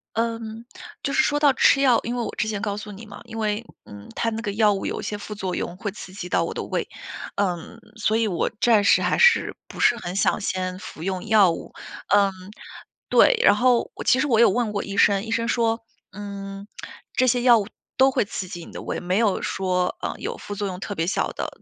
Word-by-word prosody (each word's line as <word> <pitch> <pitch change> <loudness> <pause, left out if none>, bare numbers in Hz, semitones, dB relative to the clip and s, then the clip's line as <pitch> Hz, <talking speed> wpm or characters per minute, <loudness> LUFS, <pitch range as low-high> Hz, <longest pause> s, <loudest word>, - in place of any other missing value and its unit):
嗯， 230 0 -3 0.4
就 275 - -2
是 265 - +5
说 290 - +1
到 290 -2 +5
吃 275 - +4
药， 255 -4 +5
因 240 +2 -3
为 240 - -1
我 - - -4
之 - - 0
前 210 -2 -3
告 205 -1 -2
诉 210 0 -7
你 215 +3 -10
嘛， 205 - -11
因 230 -1 -8
为， 215 +1 -1 0.2
嗯， 105 0 -12
它 230 - -1
那 225 +1 -4
个 205 - -3
药 210 0 +3
物 195 - -4
有 - - -3
一 - - -9
些 210 - -3
副 210 +1 -7
作 190 -3 -3
用， 175 - -4
会 215 -3 -3
刺 190 -2 -10
激 185 -2 -7
到 - - +1
我 - - -4
的 - - -4
胃。 - - -2 0.5
嗯， 200 +3 -2 0.2
所 220 0 +1
以 225 -2 +1
我 175 - -1
暂 220 -4 +4
时 - - +5
还 - - +1
是 480 0 +4
不 - - -9
是 240 - +5
很 180 -6 -6
想 195 - +2
先 185 -1 -2
服 160 - -10
用 185 +1 -3
药 210 -4 +5
物。 165 - -6 0.4
嗯， 200 -1 +5 0.8
对， - - +5
然 205 - +6
后 245 0 +2
我 - - -7
其 255 - +4
实 280 - +1
我 235 -6 +2
有 235 - +6
问 235 +2 0
过 205 - -2
医 195 - -6
生， 200 0 +4
医 225 - -7
生 230 0 0
说： 230 -1 +1 0.3
“嗯， 200 0 -7 0.5
这 255 - +3
些 245 0 +2
药 240 -1 +6
物 205 0 -3 0.3
都 265 +1 +5
会 230 - 0
刺 185 -2 -5
激 175 -4 -8
你 - - -13
的 - - -7
胃， - - -4
没 180 +2 -1
有 215 -4 +2
说， 180 -1 -1
呃， - - -2
有 - - -4
副 205 - -7
作 205 0 -3
用 180 -1 -6
特 205 - -4
别 165 -2 -1
小 190 - 0
的， - - -4
210 Hz, 260 characters per minute, -23 LUFS, 195-230 Hz, 0.8 s, 然